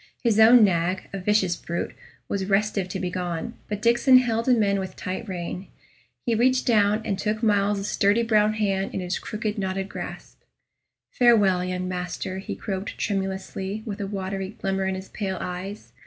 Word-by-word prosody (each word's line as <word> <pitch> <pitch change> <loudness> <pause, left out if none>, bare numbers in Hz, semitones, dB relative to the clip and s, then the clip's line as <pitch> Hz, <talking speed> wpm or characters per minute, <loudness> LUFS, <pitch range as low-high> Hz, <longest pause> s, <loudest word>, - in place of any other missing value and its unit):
His 225 -3 +3
own 225 +1 +8
nag, 180 -1 +1
a 195 - -3
vicious 190 -2 +2
brute, 170 0 -4 0.3
was 195 -1 -2
restive 200 -1 +1
to 190 - -4
be 180 -1 -2
gone, 175 -3 -3 0.2
but 210 0 -4
Diccon 240 +3 +6
held 230 -2 +1
him 240 -4 +4
in 200 -1 +1
with 190 -1 -5
tight 190 +4 -5
rein. 180 +1 -5 0.6
He 235 - +1
reached 255 +3 +3
down, 215 -2 +3
and 195 -1 -2
took 215 +2 -1
Myles's 205 -1 +2
sturdy 205 +3 +2
brown 215 -2 +3
hand 195 -3 -1
in - - -1
his 180 0 -2
crooked, 215 0 -4
knotted 190 0 -2
grasp. - - -8 0.7
"Farewell, 205 -7 +4
young 180 0 -3
master," 180 +1 -4
he 190 - -5
croaked, 195 0 -5
tremulously, 195 +1 -3
with 205 -3 -5
a 200 - -2
watery 195 0 -4
glimmer 195 0 -1
in 190 - -1
his 190 +1 -8
pale 190 -3 -3
eyes. 185 +3 -6
195 Hz, 175 wpm, -25 LUFS, 190-215 Hz, 0.7 s, own